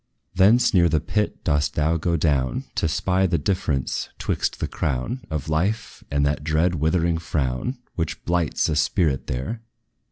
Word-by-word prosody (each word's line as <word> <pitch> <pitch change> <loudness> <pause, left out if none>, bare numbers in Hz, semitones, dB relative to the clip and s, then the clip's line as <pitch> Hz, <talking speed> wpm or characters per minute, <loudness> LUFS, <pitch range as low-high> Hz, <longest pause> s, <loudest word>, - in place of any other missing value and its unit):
Thence, 105 +6 +5
near 85 -3 +5
the 80 0 +2
pit 105 +8 -2
dost 75 0 +1
thou 80 +2 +2
go 85 +1 0
down, 70 -5 +1
To - - 0
spy 95 +4 +1
the 85 -1 +1
difference 70 -5 -1
'twixt - - -2
the - - -1
crown 75 - -2
Of 75 -3 -3
life, 90 +9 -1
and 70 0 +1
that 75 +1 0
dread 80 +3 +2
withering 80 +1 +1
frown, 80 - -2 0.2
Which 80 -2 -4
blights 85 -3 +1
a 80 - 0
spirit 75 -2 +1
there. 65 - -3
80 Hz, 160 wpm, -23 LUFS, 75-90 Hz, 0.2 s, Thence